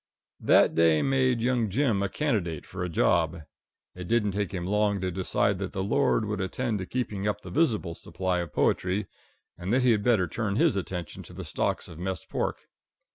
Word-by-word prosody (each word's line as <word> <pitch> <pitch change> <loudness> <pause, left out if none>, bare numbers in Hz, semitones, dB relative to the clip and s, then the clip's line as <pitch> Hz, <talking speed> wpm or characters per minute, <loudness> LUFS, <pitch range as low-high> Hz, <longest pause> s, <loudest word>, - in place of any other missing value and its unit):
That - - +5
day 80 -2 +4
made 130 -3 +2
young 120 -2 +1
Jim 115 -2 +1
a 100 - 0
candidate 95 - -1
for 90 -1 -5
a 90 - -2
job. 85 0 +1 0.5
It 90 -1 -8
didn't 110 -3 +2
take 100 -1 -2
him 90 -2 -4
long 105 +1 +1
to 95 0 -2
decide 95 +1 0
that 95 -1 -4
the 95 -1 -2
Lord 115 +1 +2
would 105 -1 -2
attend 110 +3 -2
to 95 - -5
keeping 105 -5 -2
up 105 0 -1
the - - -9
visible 115 - +1
supply 90 +1 -2
of 85 -3 -4
poetry, 95 +6 +1 0.5
and 90 +3 -3
that 125 +2 +3
he 125 - +5
had 105 -2 +2
better 105 -5 +3
turn 100 +3 -2
his - - +3
attention 90 -3 -4
to - - -12
the - - -7
stocks - - -1
of 80 - -11
mess 95 -1 -3
pork. - - -3
100 Hz, 200 wpm, -27 LUFS, 90-115 Hz, 0.5 s, That